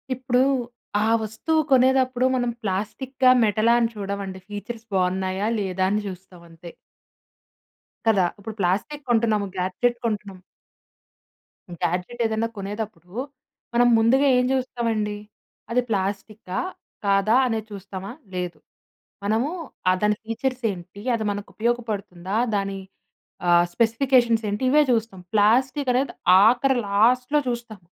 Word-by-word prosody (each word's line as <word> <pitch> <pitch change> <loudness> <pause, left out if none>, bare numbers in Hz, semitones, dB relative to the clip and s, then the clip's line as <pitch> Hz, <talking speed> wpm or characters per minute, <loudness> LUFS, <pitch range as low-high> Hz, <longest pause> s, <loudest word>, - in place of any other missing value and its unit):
ఇప్పుడు 250 0 +1 0.6
ఆ - - +2
వస్తువు 265 +9 0
కొనేదప్పుడు 255 -1 +4
మనం 245 -1 0
ప్లాస్టిక్కా, 255 +7 0
మెటలా 220 +2 +3
అని 230 -1 +2
చూడమండి. 200 -2 -5
ఫీచర్స్ 225 +2 -7
బావున్నాయా 190 +2 0
లేదా 185 -1 -1
అని 210 +1 0
చూస్తాం 185 -1 -10
అంతే. 165 +1 -11 1.3
కదా! 200 -5 +4
ఇప్పుడు 220 +1 -7
ప్లాస్టిక్కు 200 +11 -1
కొంటున్నాము, 220 -3 +2
గాడ్జెట్ 215 +7 0
కొంటున్నాము. 205 -4 -3 1.4
గ్యాడ్జెట్ 180 +8 -2
ఏదన్నా 220 +1 0
కొనేదప్పుడు 205 -2 -6 0.6
మనం 240 +1 +4
ముందుగా 260 +5 +4
ఏం 250 - +3
జూస్తామండి? 230 -5 -1 0.5
అది 250 +1 +3
ప్లాస్టిక్కా? 195 -1 -3 0.5
కాదా? 200 +3 +3
అనే 225 -2 0
చూస్తామా? 195 0 -7 0.2
లేదు. 180 -1 -4 0.7
మనము 225 +7 +1 0.4
ఆ - - +6
దాని 210 0 +2
ఫీచర్సెంటి? 225 -6 -3
అది 220 - -3
మనకు 205 0 -6
ఉపయోగపడుతుందా? 215 -5 -2 0.2
దాని 195 -1 -2 0.7
ఆహ్, 175 0 +5
స్పెసిఫికేషన్స్ 235 -1 +3
ఏంటి? 205 +4 -3
ఇవే 300 +1 +6
చూస్తాం. 225 -5 -1
ప్లాస్టిక్కు 255 +6 +3
అనేది 265 +2 0 0.3
ఆఖరి 255 +3 +3
లాస్ట్‌లో 250 +8 +3
చూస్తాం. 235 -4 -5
220 Hz, 110 wpm, -24 LUFS, 195-245 Hz, 1.4 s, ఆ